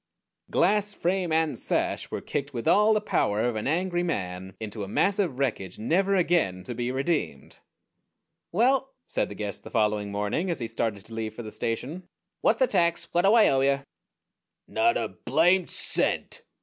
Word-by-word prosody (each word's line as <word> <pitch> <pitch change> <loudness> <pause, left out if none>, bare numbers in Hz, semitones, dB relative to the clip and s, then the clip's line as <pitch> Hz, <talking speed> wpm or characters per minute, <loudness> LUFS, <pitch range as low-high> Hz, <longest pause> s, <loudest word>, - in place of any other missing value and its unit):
Glass, 210 +3 +2
frame, 180 -1 0
and 160 -1 +2
sash - - -1
were - - -4
kicked 140 -1 -4
with 115 - -3
all 210 +2 +5
the - - +3
power 105 +1 +1
of 120 -1 0
an 110 - -2
angry 175 +3 0
man 95 - -3
into 110 -1 -6
a - - -5
mass 195 - +1
of 170 -11 0
wreckage 110 -9 -2
never 190 - +1
again 165 - +1
to 120 - -5
be 120 +1 -2
redeemed. 145 +5 -2 0.9
"Well," 265 +7 +2
said - - -1
the 105 - -8
guest 105 -1 -5
the - - -9
following 105 -1 0
morning, 105 - -1
as 170 - -1
he 115 - -3
started 110 -3 -3
to 115 - -10
leave 110 -1 -4
for 120 - -6
the 110 - -7
station, 135 +13 -4 0.3
"what's - - +3
the - - +4
tax? 170 - +1
What 175 +2 +2
do 200 - +6
I 225 - +7
owe 135 -1 +2
you?" 140 0 +2 0.8
"_Not 350 +1 +2
a - - -1
blamed 175 +2 +2
cent! - - 0
140 Hz, 185 wpm, -27 LUFS, 110-185 Hz, 0.9 s, I